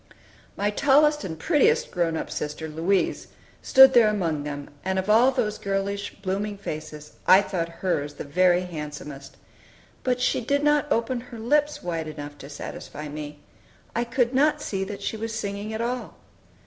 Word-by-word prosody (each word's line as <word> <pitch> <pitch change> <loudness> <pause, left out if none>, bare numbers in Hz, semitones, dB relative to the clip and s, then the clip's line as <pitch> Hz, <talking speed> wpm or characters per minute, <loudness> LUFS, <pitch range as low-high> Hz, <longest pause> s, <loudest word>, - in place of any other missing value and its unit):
My 205 +1 +1
tallest 295 +5 +4
and 160 -3 -5
prettiest 445 - +2
grown 170 -3 0
up - - -5
sister, 150 +1 -4
Louise, 165 +5 0 0.3
stood 265 0 +8
there 235 -3 +6
among 170 -8 0
them, 145 -1 -6
and 190 0 -1
of 190 +2 +1
all 235 +4 +6
those 230 -5 -1
girlish, 200 +1 -2
blooming 200 +2 -2
faces 155 -5 -7 0.2
I 190 +2 +8
thought 170 -4 -2
hers 165 -4 -2
the - - -6
very 180 +4 +3
handsomest. 150 -5 -7 0.7
But 250 -1 +1
she 250 - +1
did 285 +4 0
not 295 0 +2
open 235 +2 0
her 235 - -9
lips 295 +6 +1
wide 165 -3 -3
enough 145 -1 -7
to 140 - -10
satisfy 150 +1 -7
me. 150 0 -7 0.5
I 235 - +1
could 240 +1 0
not 300 +3 +3
see 195 -9 -3
that 200 0 -7
she 220 - -2
was 225 +1 -4
singing 200 +1 -4
at 220 +1 -3
all. 245 +1 -3
200 Hz, 170 wpm, -25 LUFS, 160-240 Hz, 0.7 s, stood